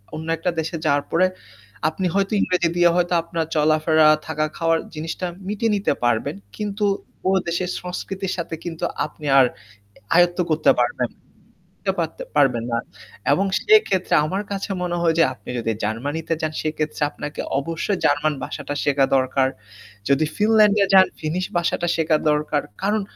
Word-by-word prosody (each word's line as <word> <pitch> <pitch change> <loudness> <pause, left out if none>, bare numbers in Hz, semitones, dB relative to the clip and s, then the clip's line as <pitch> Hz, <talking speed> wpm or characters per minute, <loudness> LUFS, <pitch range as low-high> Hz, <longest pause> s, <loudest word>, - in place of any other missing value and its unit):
অন্য 160 +1 -6
একটা 180 - -1
দেশে 160 +2 -3
যাওয়ার 145 -1 +2
পরে 185 +3 +4 0.6
আপনি 185 +4 -4
হয়তো 195 +1 +1
ইংরেজি 180 -2 +1
দিয়ে 175 0 +6
হয়তো 175 0 +1
আপনার 165 -1 -2
চলাফেরা 155 +1 +4 0.2
থাকা 155 -1 0
খাওয়ার 165 -1 +2 0.2
জিনিসটা 165 +3 -4 0.2
মিটিয়ে 210 +1 0
নিতে 200 -6 +1
পারবেন। 115 -4 +1 0.2
কিন্তু 210 0 -2 0.4
ও - - +4 0.2
দেশের 175 +1 -1
সংস্কৃতির 185 +1 -4
সাথে 165 -1 -4
কিন্তু 165 0 -6 0.2
আপনি 155 - -11
আর 130 - +7 0.7
আয়ত্ত 175 +1 +4
করতে 155 0 +4
পারবেন 120 0 0 0.8
আয়ত্ত 170 -4 -2 0.2
পারবেন 125 -5 +3
না। 115 - +1 0.6
এবং 195 +6 +1
সেক্ষেত্রে 215 - +3
আমার 190 +6 -2
কাছে 200 0 -3
মনে 175 -1 -2
হয় 165 -1 +2
যে - - +7
আপনি - - -14
যদি 115 0 -1
জার্মানিতে 145 +10 -2
যান 155 0 -2
সেক্ষেত্রে 155 0 -3
আপনাকে 145 0 -6 0.2
অবশ্যই 165 +6 -2
জার্মান 150 +1 +2
ভাষা - - -5
টা 145 - -2
শেখা 140 -1 +3
দরকার। 130 0 +2 0.6
যদি 140 +3 +3
ফিনল্যান্ড 210 -1 +4
এ - - +4
যান 190 -1 +8
ফিনিশ 170 +4 -2
ভাষা 170 - +1
টা 175 - 0
শেখা 160 -1 +2
দরকার। 150 0 0 0.2
কারণ 210 +2 +1
165 Hz, 160 wpm, -22 LUFS, 150-185 Hz, 0.8 s, যান